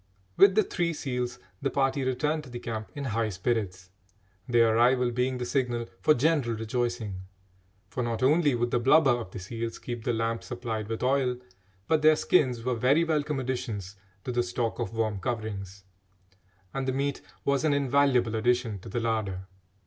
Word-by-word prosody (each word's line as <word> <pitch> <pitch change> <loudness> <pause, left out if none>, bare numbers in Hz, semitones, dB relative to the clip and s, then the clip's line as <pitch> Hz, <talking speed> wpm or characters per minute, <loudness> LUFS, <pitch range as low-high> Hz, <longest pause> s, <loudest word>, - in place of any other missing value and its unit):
With 195 -1 +6
the 215 - +5
three 170 -3 -1
seals, 125 -4 -3 0.2
the - - +1
party 135 0 +1
returned 150 +4 0
to - - -11
the 120 - -6
camp 110 -2 -5
in 145 - -4
high 115 -3 0
spirits, 95 -2 -2 0.6
their 115 -2 +4
arrival 125 +1 +4
being 125 +2 0
the 125 - -3
signal 120 -2 -1
for 150 +11 +4
general 135 -4 +1
rejoicing, 115 -3 -2 0.7
for 125 - -4
not 120 0 -2
only 145 0 +4
would 120 0 -1
the 120 - +2
blubber 135 +3 +5
of 120 -5 -2
the - - -9
seals 115 +4 -5
keep 120 -2 -6
the 120 - 0
lamp 115 0 -1
supplied 115 -3 -4
with 115 +2 -4
oil, 130 -1 +2 0.5
but 160 -1 +2
their 155 0 +6
skins 130 -8 +2
were 125 +1 0
very 130 +7 +3
welcome 150 -3 0
additions 120 -7 -4 0.3
to - - -3
the 120 0 +1
stock 120 -1 -2
of 115 -2 -3
warm 110 -3 0
coverings, 100 -4 -4 0.9
and 135 -1 -2
the 130 - +1
meat 140 +1 -1 0.2
was 140 0 +2
an 155 - +3
invaluable 140 -4 +2
addition 120 -2 +1
to - - -10
the 120 - -2
larder. 110 -5 -2
120 Hz, 180 wpm, -28 LUFS, 115-135 Hz, 0.9 s, With